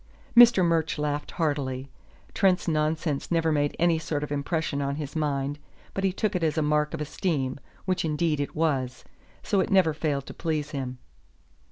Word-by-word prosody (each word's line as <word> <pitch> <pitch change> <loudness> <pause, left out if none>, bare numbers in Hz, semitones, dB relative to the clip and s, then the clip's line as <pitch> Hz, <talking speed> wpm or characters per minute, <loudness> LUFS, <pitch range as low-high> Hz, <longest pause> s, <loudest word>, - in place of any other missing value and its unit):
Mr. 235 -6 +8
Murch 165 -2 +1
laughed 150 0 -2
heartily. 140 -5 -2 0.4
Trent's 185 -3 +2
nonsense 155 -2 0
never 165 -1 +2
made 145 -1 +1
any 170 -1 +3
sort 150 -2 -2
of 150 - -5
impression 145 0 -1
on 140 0 -1
his 145 -1 -6
mind, 145 -2 -1 0.3
but 195 - -3
he 190 - +3
took 210 +2 -1
it 180 - 0
as 155 -1 +1
a 155 - +2
mark 150 0 +1
of - - -6
esteem, 145 -4 -2 0.3
which 185 -1 0
indeed 155 -1 0
it 145 - -3
was; 135 -6 0 0.4
so 200 - +1
it 190 - +1
never 185 -5 +4
failed 145 -3 -1
to - - -8
please 155 -2 -2
him. 130 -4 -4
150 Hz, 180 wpm, -27 LUFS, 145-165 Hz, 0.4 s, Mr